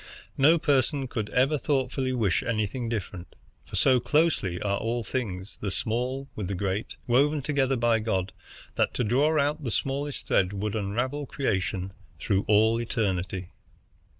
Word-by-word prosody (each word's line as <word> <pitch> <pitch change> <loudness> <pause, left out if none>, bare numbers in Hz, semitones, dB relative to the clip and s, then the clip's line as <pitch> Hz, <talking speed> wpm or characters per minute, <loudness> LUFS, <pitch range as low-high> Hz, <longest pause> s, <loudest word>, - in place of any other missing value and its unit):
No 155 +5 +5
person 140 -2 +1
could 110 -4 -3
ever 135 +4 +2
thoughtfully 135 -1 0
wish 110 -8 +1
anything 115 +1 -2
different, 100 -5 -5 0.3
for - - -7
so 130 -2 +4
closely 145 - +1
are 100 -1 -1
all 115 +1 -1
things, 100 -5 -4
the 100 - -1
small 125 +7 -2
with 105 -4 -4
the 100 - -2
great, 95 +3 -2
woven 140 +4 +2
together 135 -2 +1
by 115 -2 +2
God 95 -4 -1 0.5
that - - +1
to - - +1
draw 145 +8 +3
out 145 +2 0
the 125 - -2
smallest 140 +4 -2
thread 95 +1 +2
would 105 +2 -2
unravel 120 +8 -2
creation 95 -7 -2 0.2
through 100 +1 0
all 110 +2 +4
eternity. 95 -6 -2
115 Hz, 150 wpm, -27 LUFS, 100-135 Hz, 0.5 s, No